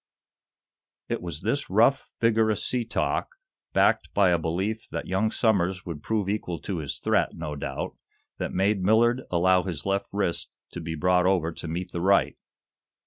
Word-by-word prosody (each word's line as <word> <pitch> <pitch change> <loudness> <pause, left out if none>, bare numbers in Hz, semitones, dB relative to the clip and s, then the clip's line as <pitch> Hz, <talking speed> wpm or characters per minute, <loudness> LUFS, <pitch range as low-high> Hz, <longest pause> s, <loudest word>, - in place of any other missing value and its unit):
It - - -2
was 85 -3 -5
this 115 +8 -1
rough, 115 +7 +3
vigorous 110 -2 +2
sea 125 -2 0
talk, 115 - -1 0.4
backed - - +2
by 100 -3 +5
a 85 - +3
belief 95 +7 -2
that - - -4
young 95 +4 +1
Somers 95 -6 +1
would 80 -4 -6
prove 105 0 -1
equal 100 -4 -2
to 95 -4 -3
his 75 -3 -4
threat, - - +1
no 75 -1 -5
doubt, 70 -1 -4 0.4
that - - -2
made 100 +1 +1
Millard 115 +6 +3
allow 90 +1 +3
his 85 -7 -5
left 100 0 0
wrist 100 -4 -1 0.2
to 90 - -6
be 80 0 -4
brought 90 +2 +3
over 90 -4 +2
to 80 - -8
meet 85 +3 -4
the 85 - -3
right. 100 +2 +3
95 Hz, 170 wpm, -26 LUFS, 85-110 Hz, 0.4 s, by